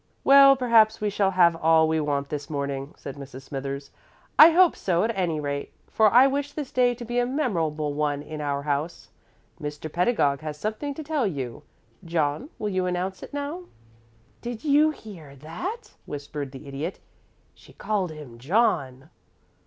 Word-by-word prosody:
"Well, 275 0 +8
perhaps 230 -4 +4
we 210 -1 -1
shall 200 -1 +1
have 175 -3 +4
all 160 -1 +4
we 160 0 +1
want 145 -2 -2
this 145 -1 -5
morning," 140 -1 -4
said 140 - -8
Mrs. 135 -1 -10
Smithers. 140 0 -6 0.5
"I 310 - +11
hope 355 +1 +5
so, 175 -1 0
at 230 +1 -1
any 175 -5 -1
rate, 140 -1 -4 0.2
for 215 -2 +4
I 250 +3 +7
wish 280 +1 -1
this 290 -4 -5
day 245 -1 +2
to 240 0 -8
be 240 +1 -1
a 245 - +2
memorable 165 - -1
one 145 -1 -1
in 155 0 -7
our 140 -1 -2
house. 150 +3 -3 0.5
Mr. 150 +1 -6
Pedagog 175 - +1
has 155 -1 -6
something 220 - -4
to 315 - -6
tell 290 -6 0
you. 135 -9 -5 0.4
John, 165 - -1
will 210 - -3
you 185 -2 -1
announce 180 +1 -3
it - - -9
now?" 290 +5 -5 0.8
"Did 240 -2 -6
you 300 +1 +4
hear 180 - -10
that?" 360 - -7
whispered 145 -1 -6
the 135 +2 -11
Idiot. 145 +7 -5 0.5
"She - - -19
called 200 -4 -2
him 145 -7 -11
'John.'" 145 - 0
170 Hz, 170 wpm, -25 LUFS, 145-240 Hz, 0.8 s, I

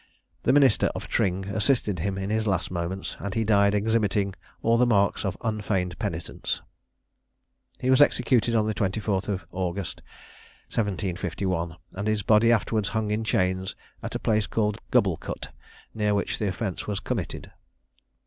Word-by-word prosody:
The - - +3
minister 135 -5 +5
of - - -5
Tring 95 0 0
assisted 105 -2 +1
him 95 +3 -1
in 95 +1 -3
his 110 0 0
last 95 -4 0
moments, 90 +2 -3
and 100 -1 -4
he 115 - +2
died 100 -1 +4
exhibiting 105 -2 +1 0.3
all 115 - +4
the 125 - +5
marks 100 -4 +2
of 95 -2 -2
unfeigned 105 -5 -1
penitence. - - -3 1.2
He 130 - +1
was 130 - +6
executed 120 -4 +3
on 110 -1 +3
the 110 - 0
24th 100 -1 -1
of 95 -4 -2
August 95 +1 -3 0.7
1751, 90 -4 -2 0.2
and 100 +2 -3
his 110 -2 +1
body 110 +3 +5
afterwards 110 -2 +1
hung 110 -2 -1
in 110 +1 0
chains 95 -3 0 0.3
at - - -5
a - - -1
place 110 -2 +1
called 105 -2 0
Gubblecut, - - 0 0.4
near 105 -1 +1
which 100 - -1
the 105 - 0
offence 95 0 -3
was 100 -1 -1
committed. 110 - -4
105 Hz, 155 wpm, -26 LUFS, 95-110 Hz, 1.2 s, was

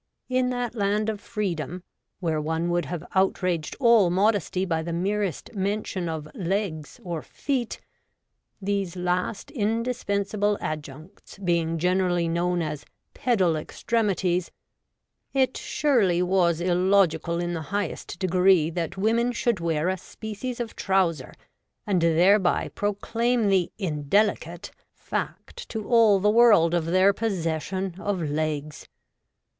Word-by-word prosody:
In 255 0 +1
that 245 -2 -2
Land 210 0 0
of 210 -2 -4
Freedom, 180 -4 -3 0.4
where 160 -3 0
one 160 +3 -1
would 175 0 0
have 175 -1 -5
outraged 185 -4 0
all 235 -7 +5
modesty 190 -1 +1
by 165 -3 -1
the 170 +1 -4
merest 195 - -2
mention 195 -3 -2
of 155 -2 -4
legs 180 -5 -3
or 170 -3 -4
feet 260 -5 -3 0.4
— - - -52
these 195 -3 -1
last 180 +3 -2
indispensable 210 -3 0
adjuncts 155 +5 -7
being 170 -3 0
generally 180 0 +1
known 175 +1 0
as 150 -2 -4 0.3
'pedal 190 -10 +2
extremities' 185 0 -1 0.5
— - - -53
it 260 - -2
surely 205 - +1
was 175 -3 +2
illogical 175 -2 +2
in 175 0 -2
the 165 - -3
highest 200 +1 -3
degree 185 -3 +3
that 170 +1 -3
women 230 +4 +2
shculd 235 -3 0
wear 165 -1 0
a 190 0 -1
species 220 +6 -6
of 235 -2 -4
trouser, 180 -8 0 0.5
and 190 -4 +1
thereby 175 +3 +3
proclaim 225 +2 0
the 190 -3 +2
in 150 -8 -4
delicate 190 -4 +1 0.2
(!) - - -52
fact 485 - -5
to 220 -2 -5
all 225 -5 +5
the 205 - +1
world 210 -7 +5
of 170 -2 +1
their 185 +3 +4
possession 190 -2 -2
of 200 -2 -2
legs. 155 -1 -3
185 Hz, 130 wpm, -25 LUFS, 170-210 Hz, 0.5 s, all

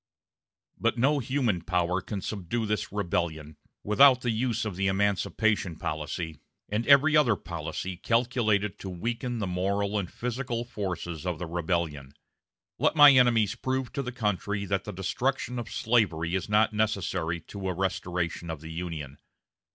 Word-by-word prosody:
But - - +1
no 140 +5 +3
human 125 -8 0
power 90 +2 0
can 100 +1 -5
subdue 105 +4 -3
this 105 -1 -2
rebellion 85 -6 -2 0.3
without 130 +4 +6
the 120 - 0
use 115 0 -1
of 105 -4 -4
the 95 +1 0
emancipation 100 -1 +1
policy 80 +1 -4 0.3
and 110 +3 -1
every 145 +2 +6
other 135 -8 +5
policy 95 0 -5
calculated 115 -3 +1
to 95 - -6
weaken 115 +6 -3
the 105 - -2
moral 100 +3 0
and 90 -3 -5
physical 120 -1 -3
forces 90 -7 -4
of 90 -3 -2
the 90 - -4
rebellion.... 80 -5 -2 0.6
Let - - +2
my 145 -2 +10
enemies 120 -5 +4
prove 130 +1 -3
to 140 - -1
the 125 -2 -4
country 105 -3 -2
that 100 0 -1
the 105 - -5
destruction 125 +6 -2
of 115 - -6
slavery 90 -8 +1
is 95 +1 -2
not 105 +1 +3
necessary 95 -6 -1
to 95 +3 -7
a - - -1
restoration 90 -2 -2
of 80 -3 -5
the 80 0 -8
Union. 80 -5 -6
100 Hz, 155 wpm, -28 LUFS, 85-120 Hz, 0.6 s, my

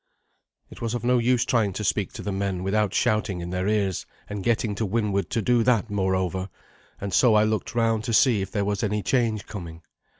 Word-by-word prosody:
It - - -12
was 115 0 -2
of 120 - -4
no 125 0 +3
use 125 +1 +2
trying 110 -5 +1
to 105 - -4
speak 100 -1 0
to - - -7
the 100 - -3
men 95 -2 -2
without 105 +1 +1
shouting 105 -3 0
in 85 0 -5
their 90 +1 -1
ears, 100 -4 0 0.2
and 100 -2 -5
getting 115 -1 +1
to 105 - -3
windward 100 -3 0
to 115 - -1
do 120 +2 +3
that, 115 -2 +2
moreover, 95 -1 -1 0.5
and 100 -1 -5
so 115 +3 +5
I 105 - +5
looked 110 +1 -1
round 115 -2 +1
to 115 - -2
see 115 -6 +4
if 95 - -4
there 100 0 -1
was 105 +2 -1
any 105 -1 -1
change 115 -5 0
coming. 85 -6 -8
105 Hz, 220 wpm, -25 LUFS, 95-115 Hz, 0.5 s, so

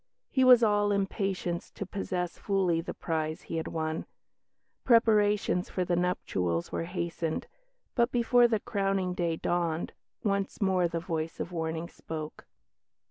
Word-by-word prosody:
He 260 - +3
was 250 -2 +8
all 205 -1 +3
impatience 195 -3 -1
to 200 - -6
possess 180 -2 -3
fully 185 -5 +1
the 170 - -6
prize 160 -2 -2
he 165 - -4
had 160 - -2
won; 160 0 -3 0.8
preparations 210 -5 +3
for 185 - -1
the 175 - +1
nuptials 90 - -1
were - - -2
hastened, 170 -2 -3 0.5
but, 235 0 +2
before 245 0 +5
the 225 -2 +1
crowning 195 -4 0
day 170 -2 0
dawned, 170 -1 -1 0.3
once 200 -1 -1
more 185 -3 +2
the 170 0 -3
voice 165 -2 -3
of 175 - -4
warning 165 0 -3
spoke. 155 -2 -7
180 Hz, 140 wpm, -29 LUFS, 165-205 Hz, 0.8 s, was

